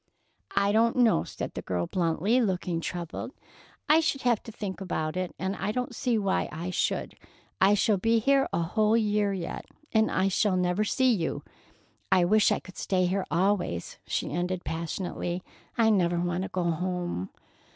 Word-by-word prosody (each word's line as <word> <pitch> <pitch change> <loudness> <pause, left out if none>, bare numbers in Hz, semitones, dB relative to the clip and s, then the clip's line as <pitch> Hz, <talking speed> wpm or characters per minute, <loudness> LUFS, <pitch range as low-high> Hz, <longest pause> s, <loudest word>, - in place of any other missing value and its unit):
"I 200 0 +3
don't 230 +2 +3
know," 245 -4 +4
said - - -6
the - - -5
girl 90 -2 -2
bluntly, 180 - +1
looking 180 -5 -1
troubled. 175 - -5 0.5
"I 310 +2 +6
should 315 -4 0
have 240 -3 +2
to 225 - -10
think 200 -3 -6
about 160 -4 -2
it, 185 -1 -3
and 190 +1 -2
I 205 - -2
don't 250 +2 -3
see 235 0 0
why 195 -2 0
I 170 +4 -4
should. - - -1 0.5
I 195 +2 +6
shall 205 0 +2
be 225 +5 +2
here 275 +4 +3
a 170 - 0
whole 215 +6 +2
year 210 -2 +1
yet, 185 -3 -4 0.3
and 220 -1 +3
I 190 +1 +1
shall 195 0 +2
never 180 +3 +1
see 255 +4 +3
you. 170 -7 -2 0.7
I 180 -2 +5
wish 215 +3 +4
I - - +2
could 185 - -14
stay 185 -2 +1
here 185 +1 -1
always," 175 - 0
she - - -2
ended 180 +3 -2
passionately. 175 +2 -3 0.3
"I 225 -1 +4
never 175 -4 +2
want 175 +1 -1
to 190 - -4
go 180 - -2
home." 175 - -2
190 Hz, 180 wpm, -28 LUFS, 175-215 Hz, 0.7 s, I